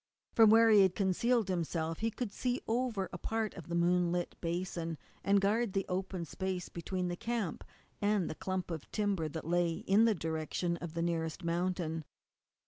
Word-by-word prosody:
From 225 -2 +7
where 225 +1 +7
he 210 -2 +8
had 190 -1 +4
concealed 215 +3 +2
himself 165 -3 -1
he 225 - +1
could 225 -1 -4
see 250 +4 -1
over 225 -4 0
a 175 - -5
part 220 +2 -1
of 175 - -10
the 170 - -3
moonlit 175 0 +2
basin, 170 -1 -2 0.3
and 200 0 +4
guard 205 +2 +1
the 195 -1 0
open 185 -1 -2
space 185 +1 -3
between 180 +2 -3
the 175 - -2
camp 225 -4 -3 0.4
and 205 -3 +2
the - - -3
clump 185 +2 -3
of 160 -3 -6
timber 200 -7 0
that 155 +1 -6
lay 175 0 +2
in 200 +6 +3
the 225 -2 +3
direction 160 +1 -2
of 170 -2 -7
the 165 - 0
nearest 165 0 -2
mountain. 170 -1 -1
180 Hz, 180 wpm, -33 LUFS, 170-205 Hz, 0.4 s, he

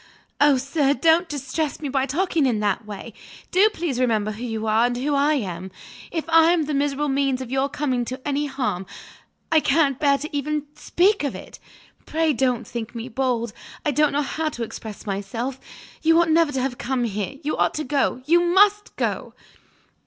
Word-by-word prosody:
"Oh, 290 -2 +5
sir, 275 +1 +1
don't 330 +2 +3
distress 285 +1 -3
me 300 - -4
by 270 0 0
talking 320 0 +1
in 230 -4 +1
that 210 +1 -1
way! 210 +2 -8 0.4
Do 395 +4 +5
please 325 - -3
remember 220 -4 +1
who 215 +3 -7
you 225 -2 -3
are, 220 +2 +3
and 245 0 -3
who 285 +4 -1
I 285 +2 +3
am. 190 -7 -4 0.4
If 325 -2 -4
I 330 +1 +5
was 320 -3 0
the 300 - -3
miserable 285 +1 0
means 275 -1 +1
of 255 -2 -7
your 270 +1 +1
coming 260 -4 -1
to 255 +3 -6
any 290 +1 0
harm 250 -9 -3 0.6
I 320 - +6
can't 280 -3 +2
bear 280 -2 +3
even 300 +1 -1
to 290 - -23
speak 390 +1 +2
of 285 - -2
it! - - -10 0.5
Pray 320 -1 +1
don't 245 -2 0
think 235 0 -6
me 230 +2 -5
bold; 240 -3 -1 0.3
I 295 - +2
don't 300 +1 +3
know 290 +1 +1
how 315 +3 -2
to 240 -5 -5
express 220 -1 -8
myself. 220 +6 -4 0.4
You 325 +1 +4
ought 340 -1 +3
never 325 -2 +4
to 265 -2 -1
have 255 -1 -3
come 250 0 -1
here; 210 +2 -3
you 300 - -1
ought - - +1
to 305 - -2
go; 270 -2 0
you 335 +4 +5
must 405 +4 +3
go!" - - -3
275 Hz, 195 wpm, -23 LUFS, 240-305 Hz, 0.6 s, I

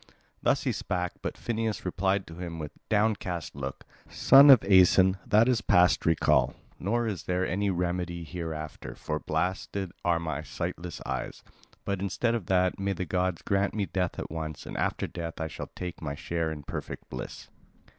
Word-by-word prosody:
Thus - - +2
he - - +1
spake, 90 -2 -2
but - - -4
Phineus 115 -3 -2
replied 95 +2 0
to 80 - -11
him 85 -1 -6
with 75 -2 -5 0.2
downcast 105 -7 0
look: 70 -1 -5 0.3
"Son 140 +2 +7
of 130 -6 +9
Aeson, 95 0 +6
that 110 +3 +5
is 125 -4 +2
past 90 -3 +4
recall, 80 -1 +3 0.2
nor 115 +6 0
is 105 -6 -3
there 90 +1 0
any 100 +3 0
remedy 90 -1 -2
hereafter, 80 -3 -6
for 75 0 -3
blasted 90 +4 -2
are 85 -1 +2
my 80 -3 -3
sightless 85 +2 -5
eyes. - - -4 0.4
But 100 -1 -1
instead 100 +4 0
of 115 -7 -3
that, 90 0 +2
may 100 0 0
the 95 0 -3
god 90 0 -1
grant 100 +1 +1
me 105 -2 0
death 90 -2 -2
at - - -5
once, 80 -2 -5
and - - -7
after - - -1
death 85 -1 -6
I 80 - -1
shall 80 - -7
take 90 -1 -6
my 70 -3 -3
share 85 +1 -2
in 75 -2 -7
perfect - - -6
bliss." 65 - -7
90 Hz, 175 wpm, -28 LUFS, 85-100 Hz, 0.4 s, of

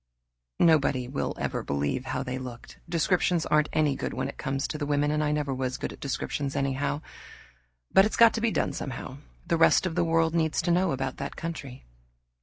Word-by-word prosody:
Nobody 140 -6 +3
will 135 +2 -3
ever - - -2
believe 70 - -2
how 135 - -2
they 130 0 -4
looked. 125 -2 -9
Descriptions 175 0 +1
aren't 150 0 +2
any 150 -3 +2
good - - -4
when - - -1
it - - -9
comes 135 +1 -1
to 150 -1 -4
women, 145 0 +1
and 150 0 +1
I 150 - +1
never 150 -2 -1
was 130 -1 -2
good - - -4
at - - -14
descriptions 140 0 -3
anyhow. 140 +1 -1 0.9
But 195 - +6
it's 215 - -2
got 230 -1 +7
to 225 - -2
be 230 - +3
done - - 0
somehow; 130 0 -6 0.3
the 170 - +1
rest 165 - +5
of 180 - -1
the 175 +1 +1
world 165 -1 +2
needs 160 -2 +1
to 175 - +1
know 180 0 +2
about 135 0 -3
that 140 +1 -5
country. 140 - -6
145 Hz, 205 wpm, -27 LUFS, 135-165 Hz, 0.9 s, got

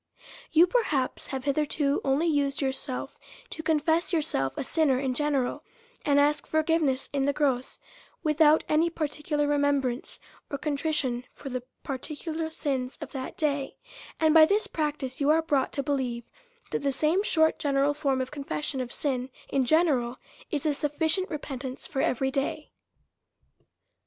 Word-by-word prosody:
You, 330 +2 +7
perhaps, 345 - 0
have 265 -2 -4
hitherto 290 0 +1
only 275 +4 +2
Used 285 -4 +1
yourself 265 -1 -2 0.3
to 320 - -5
confess 320 +2 +1
yourself 290 - +1
a - - -1
sinner 285 -1 +2
in 265 -1 -1
general, 280 -2 0 0.4
and 285 -1 +3
asked 295 0 +2
forgive 320 +1 +2
ness 270 -3 0
in 275 -1 +1
the 285 - +2
gross, 265 -3 0 0.5
without 310 0 +4
any 320 +3 +3
particular 300 -2 -2
remembrance, 285 -3 0 0.3
or 280 - -3
contrition 285 -4 -1
for 275 - -9
the 255 -1 -3 0.2
particular 315 +4 -4
sins 270 -5 -3
of - - -7
that 270 +5 -6
day; 285 -5 -1 0.4
and, 315 -1 +4
by 320 -1 +9
this 415 +4 +2
practice, 295 -4 -3
you 280 - +3
are 315 +1 +5
brought 285 -4 +1
to 280 - -1
believe 260 -5 -1 0.5
that - - 0
the 280 -1 +1
same 310 +7 +2
short, 320 -6 +3
general 280 0 +2
form 280 -3 0
of 260 - -4
confession 285 -1 -3
of 245 -1 -5
sin 260 -3 -2 0.2
in 270 -2 +1
gene 320 +7 +4
ral 245 -4 0 0.3
is 295 -1 -2
a 300 - +3
sufficient 315 +6 0
repentance 270 -4 -5
for 270 - -2
every 265 +2 +1
day. 275 0 -2
285 Hz, 155 wpm, -27 LUFS, 265-310 Hz, 0.5 s, by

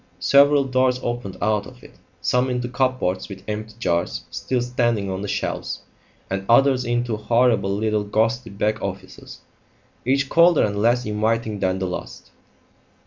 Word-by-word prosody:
Several 140 0 +5
doors 130 -1 +1
opened 120 -6 -4
out 105 -1 +1
of - - -15
it - - -14 0.3
some 125 +1 +1
into 125 -1 -2
cupboards 130 -8 -1
with 95 -2 -9
empty 110 +1 -5
jars 85 -6 -1
still 85 +10 -2
standing 120 -5 0
on 95 +1 -4
the 105 - -4
shelves, - - -3 0.4
and 95 +1 -3
others 130 +1 +4
into 120 -1 -1
horrible 115 -2 +2
little 105 -1 0
ghostly 115 +4 0
back 105 +2 -1
offices, 100 -1 -7 0.6
each 135 +2 +1
colder 170 +2 +5
and 100 -1 -1
less 120 +2 +2
inviting 110 0 -1
than 95 -1 0
the 95 - -2
last. 90 - -7
115 Hz, 150 wpm, -22 LUFS, 100-125 Hz, 0.6 s, Several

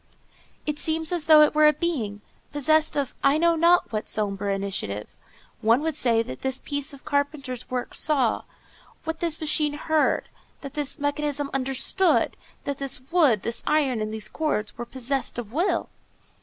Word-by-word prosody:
It 300 -1 -2
seems 320 0 +1
as 345 -3 0
though 310 -1 +9
it 300 - +5
were 305 0 +6
a 300 - +5
being, 235 -14 -2 0.3
possessed 310 +2 +2
of 280 -3 -1
I 275 +2 +4
know 335 +1 +3
not 340 +2 +4
what 215 0 -3
sombre 200 -1 0
initiative; 195 - -3 0.5
one 230 +5 +4
would 320 +1 -1
say 235 -5 +1
that 130 - -8
this 265 0 -1
piece 285 -1 -4
of 280 -1 -13
carpenter's 285 -3 -2
work 250 -1 -3
saw, 270 -7 +1 0.6
that 320 - -3
this 335 -3 -1
machine 300 -1 +1
heard, 310 +1 +1 0.3
that 275 -1 -8
this 295 -1 -2
mechanism 290 -1 -2
understood, 270 +8 +1 0.3
that 280 -1 -4
this 275 -2 -2
wood, 290 - +4
this 230 +1 -2
iron, 275 -7 +2
and 215 0 -3
these 215 -1 -5
cords 215 -8 -2
were 240 +1 -6
possessed 260 +2 -2
of 230 -2 -6
will. 345 +7 0
280 Hz, 170 wpm, -25 LUFS, 235-310 Hz, 0.6 s, though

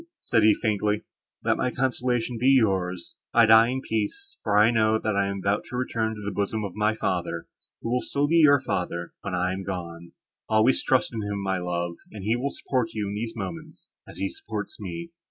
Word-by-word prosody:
said 115 - +2
he, 105 -1 +6
faintly, 105 -1 0 0.4
"let - - +2
my - - +1
consolations 125 -2 -1
be 125 - +2
yours. 95 -9 +1 0.2
I 115 -1 +7
die 110 +1 +7
in 130 +2 -2
peace; 120 - -3
for 105 -1 +1
I 105 +3 +6
know, 110 -1 +3
that 110 -1 -1
I 100 0 +2
am 100 0 -3
about 100 +1 +1
to - - -8
return 110 -3 -1
to 105 - -8
the 105 - -2
bosom 105 +2 -1
of 95 - -6
my 105 +1 +1
Father, 90 -5 -2 0.4
who 115 - -2
will 125 0 +2
still 145 +1 0
be 165 +3 +3
your 145 -3 +7
Father, 85 -7 -3
when 100 -2 -3
I 90 +1 0
am 95 - -4
gone. 85 -3 -6 0.4
Always 110 +4 +4
trust 130 -2 +1
in 110 - -3
him, 100 -1 -3
my 95 -1 0
love, 85 -1 -3
and 105 -3 -8
he 110 +4 +2
will 130 +3 -1
support 125 -5 -2
you 105 -2 -2
in - - -4
these 110 +2 -4
moments, 160 -1 -7 0.2
as - - -11
he - - -1
supports 395 0 -6
me." 170 0 -6
110 Hz, 215 wpm, -26 LUFS, 100-125 Hz, 0.4 s, I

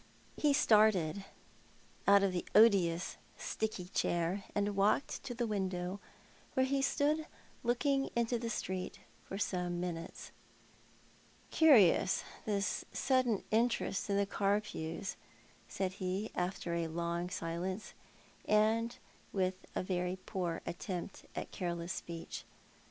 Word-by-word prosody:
He 295 - +3
started 210 - +4 0.8
out 200 0 +7
of 195 - +3
the 175 - -1
odious, 190 -6 +5 0.2
sticky 215 -4 -3
chair, 175 +3 0
and 205 0 +1
walked 205 +8 +2
to 245 -3 -4
the 240 0 0
window, 190 -3 -2 0.6
where 260 - +4
he 275 +1 +1
stood 300 +3 +1 0.4
looking 270 +3 +1
into 235 0 +1
the 230 0 -3
street 185 -4 -3 0.2
for 195 - -5
some 180 -3 -1
minutes. 170 -1 -5 1.2
"Curious, 230 - +6 0.2
this 200 -2 0
sudden 255 -6 +2
interest 225 -3 +1
in 200 - +2
the 200 - +3
Carpews," 195 -4 -1 0.5
said 190 -1 -2
he, 190 +3 -3
after 180 -1 -2
a 170 -1 0
long 170 +2 -2
silence, 185 +3 -3 0.5
and 220 +2 +2 0.3
with 185 -1 +1 0.2
a - - 0
very 180 -1 -1
poor 180 -5 -2
attempt 180 +1 -5
at - - -4
careless 170 -1 -3
speech. 170 -1 -6
195 Hz, 120 wpm, -34 LUFS, 180-220 Hz, 1.2 s, out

